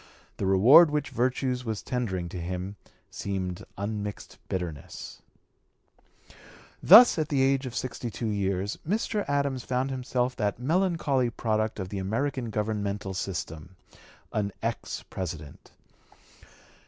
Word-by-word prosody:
The 95 - -1
reward 120 - +8
which 150 -1 -2
virtue 130 +1 0
was 110 -4 -4
tendering 95 -9 -2
to 90 0 -6
him 90 +3 -4 0.4
seemed 95 -3 -4
unmixed 105 0 -5
bitterness. 85 -6 -5 1.6
Thus 215 +1 +9
at 155 - -1
the 135 -3 +2
age 135 0 +2
of 120 - -7
sixty 125 -1 -3
two 115 - -5
years, 100 -1 -1
Mr. 210 +3 -1
Adams 140 -3 0
found 130 +2 -1
himself 125 -1 -1
that 105 -1 0
melancholy 150 - +1
product 110 -2 -1
of 95 -1 -4
the 100 - -4
American 120 +5 -1
governmental 105 -2 -2
system 90 -2 -5 0.6
an 100 -1 0
ex 115 0 -3
President. 80 -6 -7
110 Hz, 120 wpm, -27 LUFS, 95-130 Hz, 1.6 s, Thus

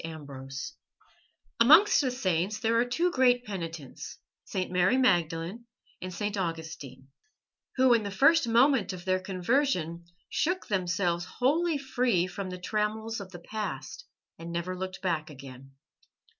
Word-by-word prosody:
AMBROSE 140 -4 -7 0.9
Amongst 315 - +7
the 265 - 0
saints 195 -5 -1
there 230 -1 0
are 240 - +3
two 335 +9 0
great 250 -3 +3
penitents, 165 -8 -7 0.3
St. 185 -1 -3
Mary 180 +6 +3
Magdalene 175 -2 +1 0.4
and 185 - -5
St. 205 +4 -3
Augustine, 160 -7 -5 0.7
who 260 -1 +5
in 230 - +3
the 205 - -4
first 275 +8 +4
moment 235 -2 +3
of 180 0 -9
their 185 0 +2
conversion 185 - -1 0.2
shook 360 +3 -1
themselves 180 -2 0
wholly 310 +5 +2
free 250 -9 +1
from 185 +1 -5
the 180 - -6
trammels 215 +3 -2
of 195 -2 -8
the 175 - -8
past 215 - -6 0.3
and 165 +1 -7
never 170 +2 -3
looked 185 +1 -6
back 165 -4 -1
again. 135 -2 -12
190 Hz, 140 wpm, -28 LUFS, 170-245 Hz, 0.9 s, Amongst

